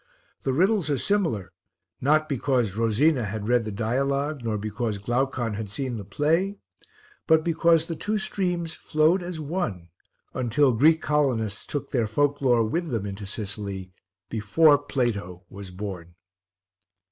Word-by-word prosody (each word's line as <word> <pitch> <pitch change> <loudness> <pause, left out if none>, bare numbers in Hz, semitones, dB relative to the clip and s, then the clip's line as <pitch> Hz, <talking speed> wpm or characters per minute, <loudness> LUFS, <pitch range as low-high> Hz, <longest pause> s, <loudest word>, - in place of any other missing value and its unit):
The 135 - 0
riddles 185 +4 +2
are 145 - +1
similar 160 - 0 0.5
not 155 +3 +3
because 125 -7 0
Rosina 115 +5 +2
had 105 0 -4
read 120 -1 +2
the 110 - -4
dialogue, 140 +6 -1
nor 110 -2 -1
because 105 +1 -3
Glaucon 120 +2 -1
had 105 0 -5
seen 120 +3 -3
the 105 - -6
play, 160 - 0 0.7
but 160 0 +5
because 165 -1 +3
the 165 - -4
two 210 +6 -1
streams 180 -5 -2
flowed 155 +5 +2
as 175 -2 -5
one 140 - -3 0.4
until 130 +2 +2
Greek 155 +8 +4
colonists 125 -9 0
took 145 - -4
their 120 -4 +1
folk 145 +6 +1
lore 120 -4 +3
with 170 +8 -2
them 115 -6 -2
into 100 0 -6
Sicily 100 -2 -5 0.4
before 140 +8 +4
Plato 110 -11 -2
was 100 -1 -8
born. 90 -3 -7
125 Hz, 145 wpm, -25 LUFS, 105-155 Hz, 0.7 s, but